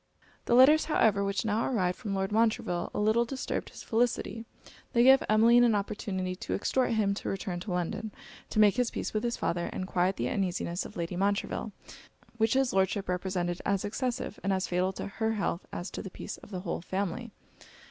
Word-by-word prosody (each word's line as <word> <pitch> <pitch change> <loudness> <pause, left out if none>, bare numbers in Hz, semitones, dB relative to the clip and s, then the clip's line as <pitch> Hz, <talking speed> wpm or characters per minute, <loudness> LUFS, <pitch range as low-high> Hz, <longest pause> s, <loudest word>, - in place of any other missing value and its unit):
The 235 - +3
letters, 285 +5 +7
however, 215 -10 +3
which 200 +2 -1
now 220 +1 +1
arrived 185 -8 0
from 200 -3 -4
Lord 195 +1 -1
Montreville, 215 -5 +1
a - - -3
little 220 +3 +3
disturbed 260 +3 -4
his - - -11
felicity. 230 -1 0 0.5
They 235 -1 +5
gave 265 +1 +7
Emmeline 230 +3 +6
an 235 -3 +4
opportunity 195 -3 -2
to - - -3
exhort 250 +3 +1
him 210 -3 +2
to 200 - -4
return 190 -2 -3
to 185 +2 -6
London 180 +5 -2 0.4
to - - -5
make 210 +1 +5
his 245 -2 +2
peace - - -4
with 215 - -1
his 240 0 -1
father, 170 0 -1
and 185 - -4
quiet 185 +1 +1
the 120 - -1
uneasiness 180 0 -2
of - - -10
Lady 170 +1 -3
Montreville, 200 +3 -1 0.7
which 225 +2 +2
his 270 -1 +2
Lordship 190 +1 +1
represented 180 -1 -2
as 200 0 0
excessive, 245 0 -3
and 195 - +1
as 190 0 0
fatal 180 +1 0
to - - -5
her 220 +2 -1
health 200 -4 -2
as 175 - -5
to - - -5
the 195 - -7
peace - - -7
of - - -15
the 185 -3 -5
whole 185 - -3
family. 195 +6 -3
200 Hz, 200 wpm, -29 LUFS, 185-230 Hz, 0.7 s, letters